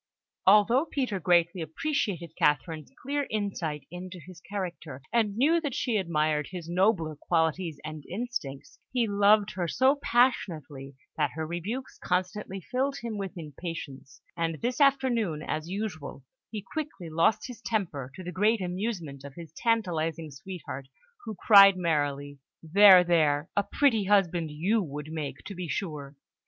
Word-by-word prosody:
Although 215 +8 +5
Peter 250 -11 -2
greatly 175 0 +2
appreciated 170 - -2
Catherine's 155 0 0
clear 285 +1 -1
insight 185 -8 -3
into 180 +1 -8
his 175 +1 -13
character, 175 -8 -6
and 220 -4 +2
knew 320 +7 +3
that 290 -6 -3
she 235 -4 0
admired 155 -5 0
his 180 -3 -7
nobler 175 -3 +1
qualities 160 0 -1
and 155 -1 -7
instincts, 185 - -5
he 245 -3 +1
loved 205 +1 +4
her 180 -3 -2
so 265 - +3
passionately 155 - 0 0.2
that 150 -2 +2
her 160 -1 -3
rebukes 190 +11 -5
constantly 185 +2 -2
filled 265 - -1
him 225 -3 -4
with 195 -2 -5
impatience; 155 -4 -8
and 165 -1 -1
this 245 +4 -2
afternoon, 240 - +2
as 155 +1 -3
usual, 180 -9 -5 0.3
he 210 -3 -6
quickly 290 - -5
lost 170 +7 +2
his 250 -3 -9
temper, 170 - -2
to 185 - -8
the 180 - -5
great 210 +5 +2
amusement 180 - -4
of 140 -1 -10
his 165 -3 -10
tantalising 165 -9 -1
sweetheart, 140 -3 -8 0.4
who 220 - -5
cried 195 -3 +9
merrily, 145 -4 -1 0.2
"There! 185 +2 +8
There! 155 -3 +2
A 205 - +4
pretty 225 -1 +2
husband 180 -5 +2
you 185 +9 +1
would 150 -2 -6
make, 155 -3 -5
to 200 - -6
be 180 -2 -5
sure!" 150 -6 -4
180 Hz, 145 wpm, -28 LUFS, 155-215 Hz, 0.4 s, cried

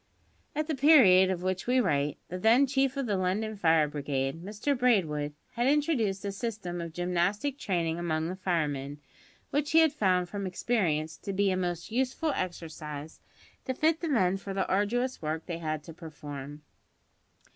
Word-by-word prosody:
At 305 +1 0
the 315 - -2
period 255 -11 +6
of 180 -2 -2
which 185 +2 -2
we 255 +1 +3
write, 145 - +1
the 180 - -5
then 230 +7 +5
Chief 270 0 0
of 275 - -1
the 205 -4 0
London 200 +4 -1
Fire 160 -5 +3
Brigade, 140 +1 -3
Mr 215 +9 -1
Braidwood, 160 - +1 0.2
had 240 +2 0
introduced 265 -10 +1
a 200 - -1
system 195 -5 -4
of 170 -1 -6
gymnastic 180 - -1
training 170 - -1
among 160 -2 -1
the 180 - -4
firemen, 150 -6 -2 0.5
which 290 +1 -1
he 325 - +7
had 320 -2 +4
found 185 -9 +2
from 200 +1 -4
experience 165 -6 -1
to 200 - -5
be 200 0 +2
a - - +1
most 175 0 -3
useful 260 +6 0
exercise 155 -4 -6 0.5
to 260 - -2
fit 320 +4 +2
the 335 - -3
men 195 -8 +2
for 195 0 -7
the 190 - 0
arduous 240 +7 0
work 155 +1 -3
they 170 -2 -4
had 155 -2 -3
to 165 - -10
perform. 150 -3 -9
185 Hz, 175 wpm, -29 LUFS, 160-240 Hz, 0.5 s, he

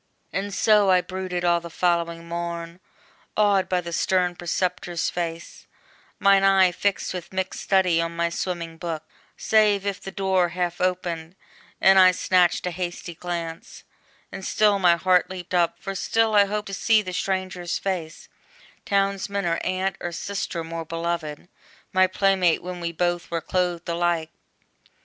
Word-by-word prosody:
And 200 +1 -2
so 205 0 +4
I 185 -1 +5
brooded 185 -1 -4
all 170 0 +3
the 170 0 -9
following 170 -1 -1
morn, 170 0 -5 0.6
Awed 205 -3 +3
by 180 -1 +1
the 170 -1 -7
stern 180 0 +1
preceptor's 175 0 -2
face, 170 -1 -5 0.5
mine 200 0 +5
eye 190 -2 +5
Fixed 195 +2 -1
with 180 -2 -6
mick 190 0 -3
study 185 -4 +2
on 165 0 -3
my 170 0 0
swimming 170 -2 -4
book: 160 -2 -4 0.3
Save 210 -2 +3
if 200 -2 -3
the - - -7
door 190 -2 +1
half 175 0 -3
opened, 175 -2 -2 0.4
and 190 0 +6
I 185 -1 +7
snatched 180 -1 +2
A 180 - -1
hasty 175 0 -5
glance, 170 -1 -6 0.5
and 195 - -7
still 205 0 +2
my 175 -2 +5
heart 180 +1 +2
leaped 185 -1 -8
up, 175 -2 +2
For 195 - -5
still 225 +3 +1
I 205 -1 +6
hoped 210 0 -3
to - - -6
see 215 +2 +3
the 185 -1 -6
stranger's 185 -2 -2
face, 175 -5 -4 0.6
Townsman, 200 0 0
or 170 -1 +1
aunt, 185 +1 -1
or 175 - -4
sister 175 -1 -4
more 165 0 -5
beloved, 165 -2 -4 0.5
My 185 0 +5
play 195 +1 +2
mate 180 -3 +2
when 180 0 -6
we 170 -1 -3
both 175 +1 -1
were 170 - -1
clothed 175 +1 -2
alike! 170 -1 0
180 Hz, 160 wpm, -24 LUFS, 170-190 Hz, 0.6 s, I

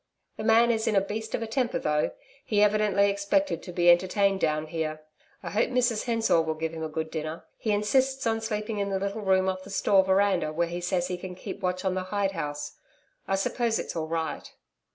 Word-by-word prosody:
The - - -5
man 230 +2 +5
is 220 -1 -1
in 215 - +2
a - - +6
beast 215 +3 -4
of 230 - -3
a - - -2
temper 240 +2 -1
though, 150 0 +1 0.3
he 210 -4 +2
evidently 205 -1 +3
expected 200 +9 0
to 180 - -8
be 175 0 +1
entertained 190 +2 +2
down 155 -2 0
here. 155 -1 -4 0.4
I - - -5
hope 210 - +1
Mrs 245 -3 +1
Hensor 225 -8 +2
will 160 -1 -2
give 160 +1 -3
him 160 - -6
a 160 - -3
good 160 +1 -4
dinner. 155 0 -5
He 220 - -3
insists 260 +6 +1
on 225 -1 +1
sleeping 215 -1 -3
in 200 0 -1
the 195 - 0
little 200 +3 -3
room 190 -1 +2
off 185 0 -2
the 195 - -12
store 195 -1 +3
veranda 190 -4 +2
where 170 +2 0
he 175 +1 -4
says 175 0 0
he 180 -1 -4
can 180 0 -7
keep 200 - -7
watch 185 0 -2
on 190 - +1
the 185 0 -2
hide 200 0 0
house. 145 -4 -5 0.5
I 195 - +1
suppose 225 +4 0
it's - - -5
all 160 -1 -2
right?' 160 0 -3
195 Hz, 225 wpm, -27 LUFS, 170-215 Hz, 0.5 s, a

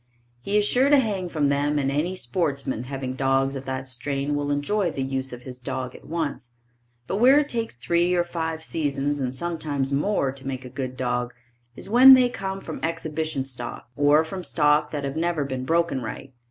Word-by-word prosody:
He 200 +10 0
is 210 - +3
sure 255 +6 +3
to 290 - +7
hang 200 -8 0
from 150 -4 +1
them 145 +1 +1
and 135 -1 0
any 160 +6 -1
sportsman 140 -5 -2
having 135 -1 -4
dogs 135 +1 +1
of 135 0 -6
that 130 0 -4
strain 140 +3 -2
will 145 0 -1
enjoy 170 +7 0
the 135 -4 -3
use 135 0 -3
of 125 0 -9
his 125 -1 -9
dog 125 0 -4
at - - -14
once, 145 -7 -4 0.5
but 190 - -2
where 260 +6 +6
it 295 - 0
takes 230 - -3
three 170 +8 +1
or 175 - +3
five 160 -2 -4
seasons 145 -3 -1
and 130 -1 -2
sometimes 145 -4 -2
more 140 -2 +1
to 135 0 -6
make 130 -1 -4
a - - -7
good 130 0 -5
dog, 125 -1 -2 0.4
is - - -1
when 255 +5 +9
they 250 -1 +4
come 195 -4 -4
from 160 - -6
exhibition 160 -3 -2
stock 120 -2 -6
or 145 +2 +4
from 185 +4 -6
stock 150 -3 +2
that 145 -2 -4
have 140 0 -3
never 165 -3 0
been 130 -1 -4
broken 165 -3 +1
right. 120 +4 -7
145 Hz, 205 wpm, -24 LUFS, 130-170 Hz, 0.5 s, when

